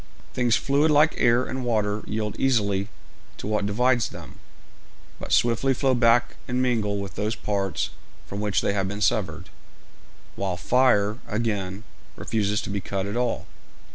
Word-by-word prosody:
Things 120 -3 +2
fluid 140 +5 +2
like 150 +1 +5
air 120 +1 +4
and 130 0 -4
water 105 -3 0
yield 105 -1 -2
easily 100 -6 +1 0.5
to - - -7
what 105 -1 0
divides 120 +3 +2
them, - - -11 0.8
but - - -7
swiftly 120 +3 +3
flow 135 +1 +2
back 120 0 +3
and 125 0 -1
mingle 115 -5 +1
with 100 -3 -5
those 105 +2 -2
parts 100 -3 -2 0.3
from 100 - -6
which 105 -2 +1
they 100 - 0
have 95 -2 0
been 100 +1 -5
severed, 105 -3 0 0.9
while 95 -2 -2
fire, 115 -1 +2
again, 105 -3 -2 0.3
refuses 105 -2 -1
to - - -5
be 100 -1 -2
cut 95 0 -3
at 100 +2 -4
all. 120 -1 -1
110 Hz, 155 wpm, -25 LUFS, 100-125 Hz, 0.9 s, like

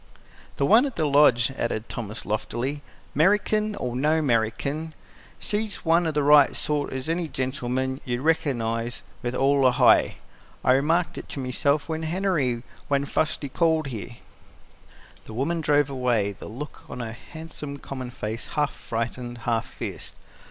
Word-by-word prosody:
"The 140 - +2
one 230 - +6
at 265 - -7
the 160 - +1
Lodge," 140 -4 +5
added 115 -1 -2
Thomas 110 -1 -5
loftily, 120 +7 -2 0.3
"'Merican 210 +6 +2
or 125 -1 -3
no 150 +5 +2
'Merican, 140 +4 0 0.4
she's 210 -1 -2
one 165 +1 +4
o' - - +1
the 150 -1 0
right 145 -1 +6
sort, 150 -1 -1
as 130 +1 -3
any 165 +1 0
gentleman 130 -1 -2
'u'd 120 0 -1
reckinize 120 -7 0 0.2
with 120 0 -2
all 135 +1 +3
a - - +5
heye. - - +5 0.5
I - - +4
remarked 165 +5 +1
it - - -8
myself 140 +3 0
to 160 -1 -3
Henery 160 -9 0 0.2
when 140 0 +1
fust 150 +2 0
we 140 - -3
called 160 -1 +1
there." 120 +1 -6 1.1
The 110 - -9
woman 160 +7 0
drove 145 -2 +2
away; 120 -6 +1
the 100 - -10
look 140 +7 -8
on - - -6
her 115 -2 -4
handsome, 150 +1 -8
common 130 -2 -6
face 115 -2 -5
half 145 -1 0
frightened, 120 +1 -4
half 115 -1 0
fierce. - - -7
140 Hz, 155 wpm, -25 LUFS, 120-160 Hz, 1.1 s, one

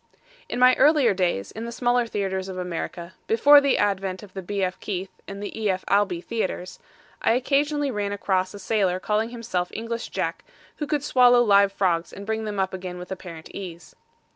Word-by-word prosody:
In - - -3
my 250 +1 +7
earlier 285 -5 +5
days 175 - -1
in 225 +2 -6
the 235 - -5
smaller 245 0 +1
theaters 195 -3 -2
of 185 - -6
America, 175 0 -5
before 285 +6 +7
the 280 -1 +2
advent 195 -1 -1
of 195 -3 -13
the 190 - -5
B. 195 +2 -2
F. 185 0 -2
Keith 190 -2 -4 0.2
and 200 +1 -7
E. 215 0 -2
F. 185 -1 -1
Albee 195 -3 +2
theaters, 185 -4 -4 0.4
I - - +3
occasionally 285 +3 +1
ran 205 -3 -2
across 190 -2 0
a - - -6
sailor 195 -3 0
calling 215 +3 0
himself 230 -7 -3
English 230 +1 -4
Jack, 170 -3 -3 0.3
who 295 - -3
could 295 -2 -1
swallow 245 -3 +5
live 200 -2 +5
frogs 175 -4 0
and 200 - -9
bring 220 +1 -2
them 205 -2 -3
up 190 0 0
again 185 -1 -6
with 180 +1 -9
apparent 175 -3 -8
ease. 175 -4 -8
200 Hz, 190 wpm, -24 LUFS, 185-230 Hz, 0.4 s, my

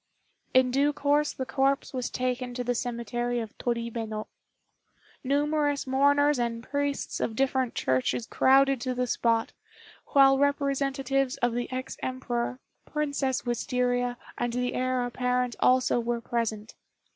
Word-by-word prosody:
In 255 -1 +5
due 285 +3 +2
course 290 +1 +2
the 260 - -5
corpse 275 +2 0
was 255 -2 -2
taken 250 -1 -2
to 250 - -2
the 245 0 0
cemetery 240 0 -2
of 220 -2 -6
Toribeno. 230 -2 -3 1.0
Numerous 290 +1 +1
mourners 285 +1 +3
and 235 -1 -2
priests 285 +2 -2
of 220 - -2
different 260 -1 0
churches 130 - 0
crowded 270 +1 +4
to 255 -1 -2
the 250 0 0
spot, 230 -2 0 0.5
while 270 -1 +5
representatives 275 -1 0
of 245 -1 +1
the 245 +1 -3
ex 255 0 -5
Emperor, 255 -1 -2 0.3
Princess 285 -3 -1
Wistaria, 245 0 0 0.2
and 240 -1 -1
the 250 0 -1
Heir 255 -1 0
apparent 250 0 -1
also 255 -1 +4
were 235 0 -1
present. 225 -2 -3
255 Hz, 135 wpm, -27 LUFS, 240-275 Hz, 1.0 s, In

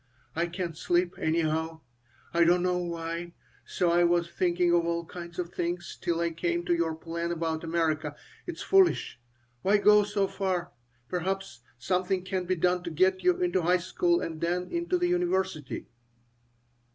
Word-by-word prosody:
I 170 +2 +1
can't 175 -1 -4
sleep, 175 +2 +1
anyhow. 160 0 0 0.5
I 170 0 +5
don't 175 +1 +4
know 180 0 +1
why. 170 0 -4 0.3
So 175 -2 +1
I 175 +1 +4
was 175 0 +3
thinking 175 -1 +2
of 170 -1 +4
all 170 0 -1
kinds 170 0 -9
of 180 0 -4
things 175 0 -3
till 170 -1 0
I 170 0 +1
came 170 +1 -1
to 175 - +2
your 165 -2 0
plan 170 +1 -4
about 160 -1 -2
America. 160 -3 0 0.3
It 350 - -4
is - - -7
foolish. 385 - +3 0.4
Why 200 +2 +4
go 210 0 +6
so 205 -1 0
far? 190 -2 -2 0.4
Perhaps 185 -6 -3 0.2
something 180 +6 0
can 185 -1 -2
be 185 +1 +1
done 180 +1 +1
to - - -2
get 185 +4 +2
you 360 -1 +4
into 350 - +1
high 180 +2 +3
school 175 -1 +1
and 160 -1 -5
then 175 +2 -1
into 345 +1 0
the 355 0 +1
university." 190 - -1
175 Hz, 170 wpm, -28 LUFS, 170-185 Hz, 0.5 s, go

